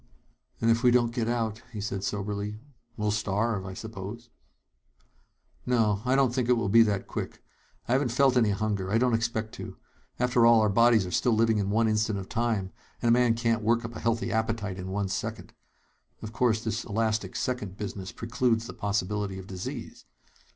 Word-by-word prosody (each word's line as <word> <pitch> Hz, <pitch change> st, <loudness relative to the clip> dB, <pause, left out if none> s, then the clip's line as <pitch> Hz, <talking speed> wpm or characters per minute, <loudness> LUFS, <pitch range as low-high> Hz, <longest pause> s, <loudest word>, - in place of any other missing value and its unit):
"And 115 Hz, 0 st, +3 dB
if 115 Hz, 0 st, +2 dB
we 125 Hz, -, +5 dB
don't 120 Hz, -1 st, +3 dB
get 115 Hz, -2 st, -1 dB
out," 115 Hz, -2 st, -1 dB
he 110 Hz, -, -6 dB
said 100 Hz, -2 st, -3 dB
soberly, 105 Hz, +1 st, -3 dB, 0.4 s
"we'll 105 Hz, -1 st, 0 dB
starve, 105 Hz, -1 st, -1 dB
I 95 Hz, -, -7 dB
suppose." 110 Hz, +2 st, -8 dB, 1.3 s
"No, 110 Hz, -5 st, +1 dB
I 130 Hz, +1 st, +3 dB
don't 135 Hz, -3 st, +3 dB
think 125 Hz, -2 st, -1 dB
it 125 Hz, -, +5 dB
will 105 Hz, -4 st, -1 dB
be 115 Hz, +3 st, +7 dB
that 105 Hz, -3 st, +1 dB
quick. -, -, -6 dB, 0.4 s
I -, -, -2 dB
haven't 135 Hz, -1 st, +2 dB
felt 130 Hz, +2 st, +3 dB
any 115 Hz, -4 st, +4 dB
hunger. 100 Hz, -2 st, -1 dB
I 110 Hz, -, +3 dB
don't 125 Hz, 0 st, +2 dB
expect 115 Hz, -1 st, -1 dB
to. -, -, -8 dB, 0.4 s
After 125 Hz, -1 st, +3 dB
all, 115 Hz, -1 st, +7 dB
our 110 Hz, -1 st, +3 dB
bodies 115 Hz, 0 st, +4 dB
are 90 Hz, -, -6 dB
still 120 Hz, +6 st, +2 dB
living 110 Hz, -1 st, +3 dB
in 100 Hz, -1 st, -1 dB
one 110 Hz, +2 st, +2 dB
instant 110 Hz, -1 st, +1 dB
of 95 Hz, -1 st, -7 dB
time, 110 Hz, -5 st, -1 dB, 0.3 s
and 120 Hz, -, +1 dB
a -, -, +6 dB
man 120 Hz, -1 st, +4 dB
can't 115 Hz, -1 st, +1 dB
work 115 Hz, +2 st, +1 dB
up 115 Hz, 0 st, -7 dB
a -, -, -5 dB
healthy 115 Hz, 0 st, 0 dB
appetite 110 Hz, -4 st, -1 dB
in 90 Hz, -, -5 dB
one 100 Hz, +1 st, -1 dB
second. 100 Hz, -, -4 dB, 0.7 s
Of 110 Hz, 0 st, -6 dB
course, 115 Hz, -3 st, +1 dB
this 115 Hz, +1 st, -2 dB
elastic 110 Hz, -3 st, -1 dB
second 105 Hz, -7 st, -3 dB
business 100 Hz, -3 st, -5 dB
precludes 115 Hz, +2 st, 0 dB
the -, -, -7 dB
possibility 100 Hz, -1 st, -2 dB
of 95 Hz, -, -8 dB
disease. 95 Hz, -1 st, -7 dB
110 Hz, 195 wpm, -28 LUFS, 100-115 Hz, 1.3 s, be